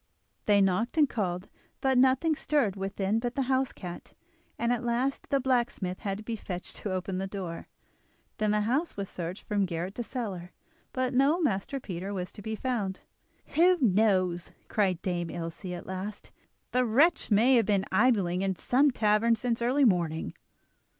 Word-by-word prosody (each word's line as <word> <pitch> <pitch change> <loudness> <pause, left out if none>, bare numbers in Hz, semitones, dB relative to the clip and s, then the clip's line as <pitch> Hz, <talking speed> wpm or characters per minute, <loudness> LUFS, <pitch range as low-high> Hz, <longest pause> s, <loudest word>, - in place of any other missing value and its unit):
They 205 -1 +5
knocked 195 - +1
and 300 -2 +6
called, 185 -6 -2 0.3
but 265 -1 +2
nothing 265 +5 +4
stirred 280 -10 +1
within 195 +2 -1
but 240 +1 -3
the 275 - +1
house 260 0 +1
cat, 175 -2 -9 0.4
and 235 +1 +1
at 245 0 -2
last 245 +3 -1
the 275 - +2
blacksmith 240 -8 0
had 195 -1 -3
to 215 - -9
be 230 +1 -3
fetched 180 -4 -6
to 205 - -4
open 185 0 -2
the 195 - -2
door. 185 -4 -6 0.7
Then 215 0 +1
the 210 0 +2
house 260 +9 0
was 200 -1 -4
searched 175 +2 -5
from 205 -3 0
garret 175 +2 -3
to 240 - -4
cellar, 200 -8 -5 0.4
but 255 0 -1
no 275 +7 +4
Master 275 - -1
Peter 195 -2 -5
was 180 -1 -4
to - - -11
be 220 +2 -3
found. 215 -6 -2 0.5
"Who 360 +3 +5
knows?" 190 - +2 0.2
cried 190 -5 +1
Dame 175 -2 -2
Ilse 165 +3 -6
at 180 -1 -5
last, 190 +3 -6 0.4
"the 250 0 +3
wretch 280 +9 +3
may 230 +5 +5
have 225 - +2
been 200 -2 +2
idling 190 -4 +3
in 195 -1 0
some 270 +10 +3
tavern 225 -1 +3
since 235 0 -2
early 260 +4 +3
morning." 170 -6 +1
210 Hz, 175 wpm, -29 LUFS, 185-250 Hz, 0.7 s, and